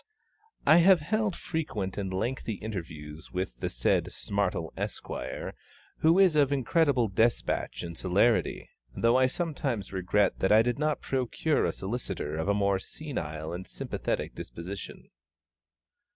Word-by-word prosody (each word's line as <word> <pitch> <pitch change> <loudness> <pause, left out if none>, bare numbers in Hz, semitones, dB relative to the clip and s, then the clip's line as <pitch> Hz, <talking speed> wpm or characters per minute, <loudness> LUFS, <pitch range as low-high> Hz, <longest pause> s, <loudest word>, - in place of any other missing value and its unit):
I 155 - +7
have 175 0 +6
held 215 +3 0
frequent 110 - -3
and 95 -2 -3
lengthy 115 +4 -2
interviews 80 -7 -7
with 90 -10 -3
the - - -1
said - - +1
SMARTLE, - - -1
Esq., - - -4 0.9
who 165 +3 +5
is 190 -5 +5
of 145 -2 +4
incredible 140 -2 +2
despatch 110 +4 0
and 85 -1 -6
celerity 100 +7 +2 0.3
though 115 +1 +4
I 130 0 +5
sometimes 135 - -2
regret 95 +2 +1
that 95 - +2
I 110 +1 +7
did 120 +3 -1
not 150 0 0
procure 135 +4 0
a - - +1
solicitor 95 -7 -4
of 80 +3 -2
a 100 - +3
more 100 -1 +2
senile 80 - -5
and 90 +1 -6
sympathetic - - -3
disposition. 90 +4 -8
110 Hz, 135 wpm, -29 LUFS, 95-145 Hz, 0.9 s, I